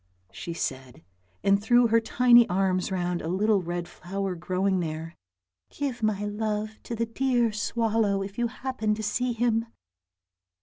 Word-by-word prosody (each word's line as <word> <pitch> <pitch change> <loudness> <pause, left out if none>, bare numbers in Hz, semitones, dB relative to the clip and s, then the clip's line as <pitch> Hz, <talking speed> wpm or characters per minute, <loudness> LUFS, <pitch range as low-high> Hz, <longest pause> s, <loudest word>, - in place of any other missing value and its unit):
she 170 - -6
said, 130 -6 -5 0.4
and 200 0 +3
threw 240 +3 +4
her 230 0 +4
tiny 240 0 +5
arms 185 0 +1
round 180 -2 -1
a - - -5
little 200 +3 +2
red 175 0 -4
flower 195 +1 -4
growing 185 +2 0
there. 165 0 -4 0.3
" 90 0 -58
Give 270 -4 -3
my 210 -2 0
love 215 +1 -3
to 235 - -4
the 230 +1 0
dear 240 0 +1
swallow 215 -2 0
if 195 0 -8
you 240 - +2
happen 230 -4 -2
to 220 - -6
see 250 +4 0
him." 230 0 +1
210 Hz, 160 wpm, -27 LUFS, 180-230 Hz, 0.4 s, tiny